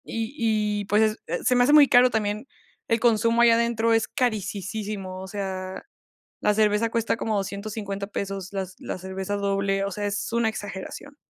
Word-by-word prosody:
Y 225 +2 -4 0.5
y, - - -6
pues, 215 +2 +2
eh, - - -2
se 250 - +3
me 245 - +5
hace 285 +4 +4
muy 295 -2 +8
caro 250 0 +6
también 215 +1 -2 0.4
el 230 0 +2
consumo 230 0 +3
ahí 235 - +7
adentro, 230 0 +2
es 225 - +2
carisisísimo. 205 -5 -3
O 190 - -7
sea, 190 -2 -5 0.6
la 210 - +2
cerveza 215 +1 +2
cuesta 230 0 0
como 220 -2 -1
$250 200 0 -4
pesos, 195 -2 -5
las 190 -2 -4
la - - -5
cerveza 190 +2 -4
doble, 195 0 0
o 200 - -2
sea, 205 +2 -3
es 205 +2 -3
una 235 -1 +2
exageración. 205 +7 -7
210 Hz, 175 wpm, -25 LUFS, 195-230 Hz, 0.6 s, muy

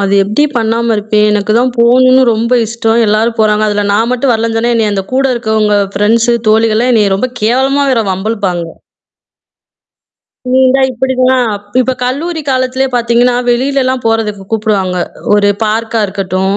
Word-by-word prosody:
அது 200 0 0
எப்படி 210 +9 0
பண்ணாம 230 +1 0
இருப்பேன்? 210 0 +1
எனக்கு 210 0 0
தான் 250 0 0
போணும்னு 255 +2 +4
ரொம்ப 235 +3 0
இஷ்டம். 225 +1 -1
எல்லாரும் 225 +2 0
போறாங்க. 215 0 +2
அதுல 205 0 -1
நான் 225 +4 0
மட்டும் 250 +1 0
வரலன்னு 225 0 -1
சொன்னா, 235 +1 0
என்னைய 215 -2 0
அந்த 195 -1 -3
கூட 270 +1 +1
இருக்கவங்க 220 -2 0 0.2
ஃப்ரெண்ட்ஸ் 225 +4 +1 0.2
தோழிகள்லாம் 225 +3 +2
என்னைய 205 -3 +2
ரொம்ப 255 +6 -2
கேவலமா 265 +5 +1
வேற 230 -3 +1
வம்பு 190 +4 -3
இழுப்பாங்க. 180 -6 -3 1.8
நீ 260 +1 +2
இந்தா 265 +1 +2
இப்படிதான், 255 -1 0 0.3
இப்ப 260 +1 0
கல்லூரி 315 +6 -3
காலத்திலே 260 +1 0
பார்த்தீங்கன்னா, 240 +1 +1
வெளிலலாம் 260 0 0
போறதுக்கு 210 -3 -2
கூப்புடுவாங்க. 200 -4 -1 0.4
ஒரு 205 0 +2 0.2
பார்க்கா 225 +1 -2
இருக்கட்டும். 190 0 -2
225 Hz, 150 wpm, -11 LUFS, 210-250 Hz, 1.8 s, போணும்னு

